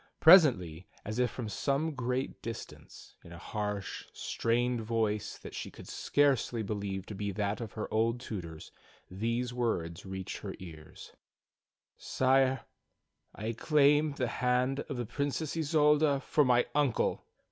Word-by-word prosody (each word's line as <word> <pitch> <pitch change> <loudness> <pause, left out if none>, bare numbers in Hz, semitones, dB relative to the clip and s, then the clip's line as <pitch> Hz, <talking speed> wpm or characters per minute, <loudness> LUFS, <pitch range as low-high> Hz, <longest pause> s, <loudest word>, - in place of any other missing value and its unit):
Presently, 105 - +6 0.2
as 110 +3 -3
if 125 -1 +3
from 120 -4 -6
some 140 +8 -1
great 130 0 -3
distance, 115 0 -9
in 85 - -13
a 85 - -9
harsh, 105 +1 -4
strained 120 +1 0
voice 110 -2 -1
that - - -10
she - - -5
could - - -13
scarcely 130 -5 +1
believe 100 -2 -4
to 105 - -7
be 100 +1 -3
that 105 +3 -2
of 110 -4 -6
her 110 - -4
old 115 +2 +1
tutor's, 85 -9 -7 0.4
these 115 +5 -2
words 90 -9 -2
reached 95 -1 -5
her - - -6
ears: 80 -4 -11 0.9
"Sire, 130 0 +2 0.7
I 110 +2 -3
claim 150 +4 +3
the 130 -2 -1
hand 125 +3 +1
of 140 - -3
the 120 - -2
Princess 145 +5 -2
Isolda 150 -2 +3
for 150 - +2
my 125 -2 +4
uncle. 145 -5 +1
120 Hz, 140 wpm, -31 LUFS, 105-140 Hz, 0.9 s, Presently